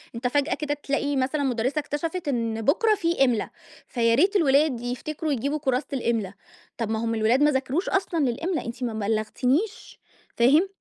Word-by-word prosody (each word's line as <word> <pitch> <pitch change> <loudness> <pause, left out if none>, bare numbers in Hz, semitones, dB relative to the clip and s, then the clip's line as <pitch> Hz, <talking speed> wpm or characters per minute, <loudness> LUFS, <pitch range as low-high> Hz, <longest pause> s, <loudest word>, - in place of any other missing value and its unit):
أنتَ 240 +2 -1
فجأة 285 +5 +1
كده 295 -1 -2
تلاقي 285 +1 -1
مثلًا 275 +3 0
مُدرسة 255 +2 0
اكتشفت 315 +3 -4
إن 230 -4 -1
بُكرة 425 - +3
في 340 -6 -1
إملا، 240 -4 0 0.4
فياريت 245 - +2
الولاد 285 - +3
يفتكروا 290 +6 -3
يجيبوا 280 +3 -1
كُرّاسة 265 -2 0
الإملا، 230 -7 -1 0.4
طب 230 -3 -2
ما 220 0 -1
هُم 230 0 -1
الولاد 225 +6 +3
ما 295 - +5
ذاكروش 265 +6 -1
أصلًا 375 -4 0
للإملا، 300 +6 -1
أنتِ 235 +2 -6
ما 235 - -2
بلَّغتِنِيش، 245 - -1 0.4
فاهم؟ 285 +10 +5
270 Hz, 160 wpm, -25 LUFS, 235-305 Hz, 0.4 s, ما